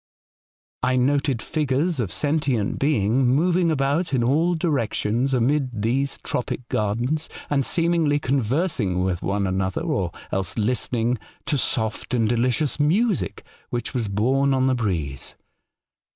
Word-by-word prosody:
"I 130 Hz, 0 st, +2 dB
noted 135 Hz, -1 st, +1 dB
figures 150 Hz, +2 st, 0 dB
of 105 Hz, -7 st, -1 dB
sentient 140 Hz, -8 st, 0 dB
being 130 Hz, -3 st, +2 dB
moving 170 Hz, +7 st, +3 dB
about 145 Hz, +3 st, 0 dB
in 120 Hz, -, +2 dB
all 160 Hz, +8 st, +2 dB
directions 135 Hz, -5 st, 0 dB
amid 130 Hz, -3 st, +1 dB
these 135 Hz, +5 st, 0 dB
tropic 125 Hz, 0 st, -3 dB
gardens, 120 Hz, +9 st, -1 dB, 0.2 s
and 140 Hz, -2 st, +2 dB
seemingly 165 Hz, -2 st, +2 dB
conversing 130 Hz, -, 0 dB
with 90 Hz, -2 st, -1 dB
one 100 Hz, +1 st, 0 dB
another, 95 Hz, 0 st, -1 dB
or 150 Hz, -, -1 dB, 0.2 s
else 95 Hz, +1 st, -1 dB
listening 120 Hz, +1 st, 0 dB, 0.3 s
to -, -, 0 dB
soft 110 Hz, -2 st, -2 dB
and 115 Hz, -2 st, +2 dB
delicious 125 Hz, +6 st, 0 dB
music 190 Hz, +7 st, +1 dB, 0.3 s
which 120 Hz, +2 st, -3 dB
was 120 Hz, -5 st, -1 dB
borne 135 Hz, +7 st, +2 dB
on 130 Hz, 0 st, +2 dB
the 130 Hz, -, +3 dB
breeze. 85 Hz, -, -2 dB
130 Hz, 130 wpm, -23 LUFS, 110-145 Hz, 0.3 s, moving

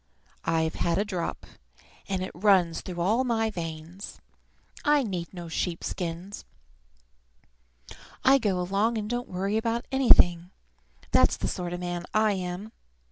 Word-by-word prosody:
I've 160 Hz, -1 st, +1 dB
had 170 Hz, -1 st, 0 dB
a 205 Hz, -, +1 dB
drop, 185 Hz, -5 st, -4 dB, 0.6 s
and 190 Hz, -1 st, -1 dB
it 185 Hz, -, -5 dB
runs 180 Hz, -3 st, +3 dB
through 180 Hz, -2 st, -6 dB
all 220 Hz, +8 st, +2 dB
my 225 Hz, -3 st, +1 dB
veins. 165 Hz, +1 st, -7 dB, 0.6 s
I 295 Hz, -2 st, +4 dB
need 180 Hz, -7 st, -4 dB
no 175 Hz, -2 st, -7 dB
sheep 165 Hz, +1 st, -2 dB
skins. 180 Hz, +3 st, -4 dB, 1.8 s
I 270 Hz, +1 st, +6 dB
go 200 Hz, -6 st, 0 dB
along 200 Hz, +6 st, +1 dB
and 210 Hz, -1 st, -3 dB
don't 240 Hz, +2 st, -3 dB
worry 195 Hz, +4 st, -1 dB
about 230 Hz, +1 st, -1 dB
anything. 180 Hz, -10 st, +5 dB, 0.6 s
That's -, -, +4 dB
the -, -, -2 dB
sort 175 Hz, -1 st, -3 dB
of 175 Hz, 0 st, -4 dB
man 175 Hz, -1 st, -3 dB
I 215 Hz, 0 st, +4 dB
am! 185 Hz, +2 st, -4 dB
185 Hz, 140 wpm, -27 LUFS, 175-220 Hz, 1.8 s, I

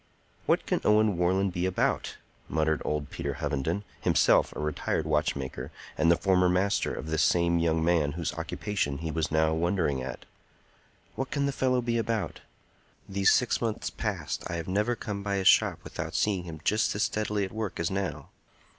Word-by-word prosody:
"What -, -, +2 dB
can -, -, 0 dB
Owen 105 Hz, -1 st, +4 dB
Warland 95 Hz, +2 st, +1 dB
be 90 Hz, +1 st, 0 dB
about?" 95 Hz, -, -1 dB, 0.3 s
muttered 80 Hz, -1 st, +1 dB
old 75 Hz, -1 st, -2 dB
Peter 70 Hz, -1 st, -3 dB
Hovenden, 80 Hz, +5 st, -2 dB, 0.2 s
himself -, -, +4 dB
a -, -, -5 dB
retired 75 Hz, +1 st, -1 dB
watchmaker, 75 Hz, -3 st, -1 dB, 0.3 s
and 80 Hz, +1 st, +3 dB
the 85 Hz, -, +5 dB
former 90 Hz, 0 st, +3 dB
master 95 Hz, +3 st, +1 dB
of -, -, -5 dB
this 80 Hz, 0 st, 0 dB
same 85 Hz, -1 st, +3 dB
young 80 Hz, -1 st, +1 dB
man 80 Hz, -4 st, +2 dB
whose 85 Hz, 0 st, -3 dB
occupation 80 Hz, -1 st, -2 dB
he 80 Hz, +1 st, -4 dB
was 80 Hz, 0 st, -1 dB
now 80 Hz, 0 st, +2 dB
wondering 80 Hz, -5 st, 0 dB
at. 65 Hz, 0 st, -6 dB, 0.9 s
"What 135 Hz, 0 st, -3 dB
can 140 Hz, -1 st, 0 dB
the 140 Hz, -, +1 dB
fellow 130 Hz, -2 st, +1 dB
be 115 Hz, -1 st, 0 dB
about? 115 Hz, -2 st, -2 dB, 0.7 s
These 100 Hz, 0 st, +2 dB
six 125 Hz, -, +2 dB
months 115 Hz, -2 st, -2 dB
past -, -, -3 dB
I 85 Hz, -, -3 dB
have 85 Hz, -1 st, -4 dB
never 105 Hz, +6 st, +1 dB
come 105 Hz, -3 st, -5 dB
by 100 Hz, 0 st, -1 dB
his 95 Hz, -1 st, +1 dB
shop -, -, +5 dB
without -, -, -6 dB
seeing 95 Hz, -4 st, +1 dB
him 80 Hz, -2 st, -8 dB
just 105 Hz, 0 st, +1 dB
as 100 Hz, -, +1 dB
steadily 105 Hz, -1 st, 0 dB
at 95 Hz, -, -8 dB
work 110 Hz, -3 st, -4 dB
as 85 Hz, +1 st, 0 dB
now. 95 Hz, -1 st, -3 dB
90 Hz, 180 wpm, -28 LUFS, 80-105 Hz, 0.9 s, the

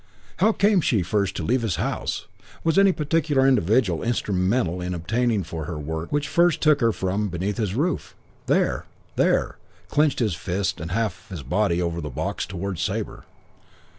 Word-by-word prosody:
"How 220 Hz, -, +4 dB
came 205 Hz, -3 st, +3 dB
she 110 Hz, -, +2 dB
first 100 Hz, +1 st, 0 dB
to -, -, -3 dB
leave 125 Hz, +3 st, +1 dB
his 110 Hz, -7 st, -1 dB
house? -, -, -2 dB, 0.4 s
Was 165 Hz, +3 st, +3 dB
any 195 Hz, -1 st, +6 dB
particular 150 Hz, -4 st, +1 dB
individual 110 Hz, -6 st, +2 dB
instrumental 95 Hz, -4 st, 0 dB
in 90 Hz, 0 st, -3 dB
obtaining 110 Hz, +4 st, 0 dB
for 80 Hz, -2 st, -5 dB
her 80 Hz, -1 st, -5 dB
work 80 Hz, +2 st, -5 dB
which 145 Hz, 0 st, 0 dB
first 170 Hz, +1 st, +3 dB
took 150 Hz, -2 st, +4 dB
her 115 Hz, -1 st, +4 dB
from 100 Hz, +1 st, -1 dB
beneath 95 Hz, +3 st, -3 dB
his 105 Hz, -4 st, -1 dB
roof? 155 Hz, +6 st, -1 dB, 0.3 s
'There! -, -, +1 dB, 0.3 s
There!' -, -, +2 dB, 0.3 s
Clenched 150 Hz, -3 st, +2 dB, 0.2 s
fist 95 Hz, -1 st, -2 dB
and 80 Hz, -, -5 dB
half 110 Hz, +3 st, -2 dB
his 90 Hz, -7 st, -6 dB
body 85 Hz, +6 st, +1 dB
over 85 Hz, -1 st, -1 dB
the 75 Hz, -, -4 dB
box 60 Hz, -, -3 dB
towards 95 Hz, -1 st, -4 dB
Sabre. -, -, -3 dB
100 Hz, 165 wpm, -24 LUFS, 90-135 Hz, 0.4 s, any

